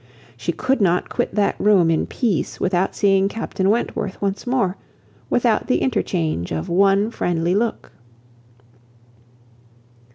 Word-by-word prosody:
She - - -3
could 260 -2 -1
not 180 -2 +1
quit - - -2
that 205 -1 +1
room 190 -5 +4
in 160 - 0
peace 215 - -2
without 185 0 0
seeing 195 -1 +3
Captain 195 -3 -2
Wentworth 205 -3 -1
once 200 +4 -3
more, 240 -7 +1 0.5
without 235 -3 +1
the 255 - +2
interchange 160 - -1
of 80 0 -3
one 195 +4 +3
friendly 175 -4 -1
look. 225 +4 -2
195 Hz, 125 wpm, -21 LUFS, 175-220 Hz, 0.5 s, room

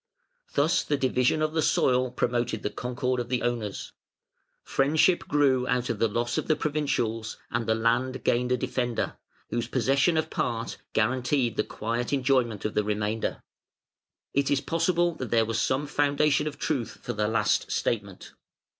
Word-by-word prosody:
Thus 145 +4 +3
the 145 - 0
division 130 +3 +2
of 155 0 0
the 160 - +1
soil 130 -3 +2
promoted 120 -2 -1
the 105 - -1
concord 125 +1 -2
of 120 0 -4
the 125 -1 0
owners; 115 -5 -3 0.7
friendship 155 +6 +2
grew 135 -4 +2
out 125 0 0
of - - -4
the 115 - +3
loss 120 +3 -1
of - - -5
the 155 - +3
provincials, 135 -8 -1
and 115 -1 -1
the 110 - +3
land 120 +3 0
gained 125 +1 +1
a 125 - +3
defender, 125 -1 -2 0.4
whose 120 0 -1
possession 135 +6 +2
of 160 - -1
part 115 -2 -2 0.2
guaranteed 120 +1 +1
the - - +1
quiet 115 +4 -3
enjoyment 125 -5 +1
of 110 - -1
the 105 - +1
remainder". 105 +1 -2 0.9
It 140 0 +1
is 140 - +3
possible 170 +2 +1
that 130 - -5
there 115 -1 +3
was 115 0 -1
some 135 +3 0
foundation 145 +1 +2
of 145 - -5
truth 135 -7 -2
for 120 - -3
the 105 -1 0
last 115 +1 +1
statement. 100 -5 -2
125 Hz, 165 wpm, -27 LUFS, 115-140 Hz, 0.9 s, Thus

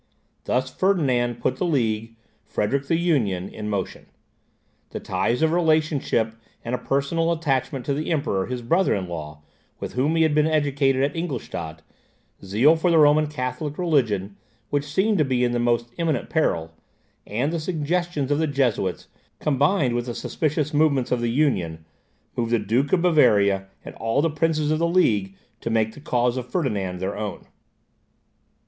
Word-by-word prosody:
Thus 130 +1 -1
Ferdinand 130 - +1
put - - 0
the - - -2
League, 115 -6 -1 0.3
Frederick 135 +7 -1
the 165 - +2
Union, 115 - 0
in 105 -1 -6
motion. 100 -2 -4 0.8
The - - -5
ties 105 +9 -1
of 160 - +3
relationship 155 -9 +1 0.3
and 120 - -3
a 125 - 0
personal 140 +6 0
attachment 135 -5 -1
to 140 - 0
the 150 +3 -3
Emperor, 120 - 0
his 125 -1 -4
brother 170 +10 +2
in 95 -2 -3
law, 75 -3 -7 0.4
with - - -6
whom 140 +6 +1
he 165 - +4
had 160 -2 +2
been 150 +1 +3
educated 140 -3 +2
at 140 - -1
Ingolstadt, 100 - -5 0.6
zeal 115 - +4
for 165 +2 +1
the 165 - +4
Roman 150 0 +5
Catholic 145 +1 -4
religion, 110 - 0 0.3
which 145 0 -1
seemed 200 +4 +2
to - - +5
be 130 -3 0
in 120 - +2
the 120 - 0
most 120 0 0
imminent 165 -3 -1
peril, 85 - 0 0.5
and 125 +10 -1
the 170 - -1
suggestions 160 -2 -1
of 145 - +2
the 160 - +1
Jesuits, 125 -10 -1 0.3
combined 145 -1 +2
with 120 +1 -2
the 120 - -4
suspicious 150 -1 -2
movements 145 -4 +2
of 125 -1 +1
the 120 - 0
Union, 95 - 0 0.5
moved 115 -1 -1
the - - +5
Duke 120 +7 0
of 180 -2 +3
Bavaria, 100 - +4 0.2
and - - -8
all 115 +6 0
the 165 - +1
princes 155 -1 0
of 155 - +1
the 170 - +2
League, 105 - +2 0.2
to 115 - -4
make 110 -1 +1
the - - -12
cause 125 -2 0
of 125 -1 -5
Ferdinand 105 - -1
their 95 +2 -3
own. 105 -4 -5
135 Hz, 170 wpm, -23 LUFS, 115-155 Hz, 0.8 s, Roman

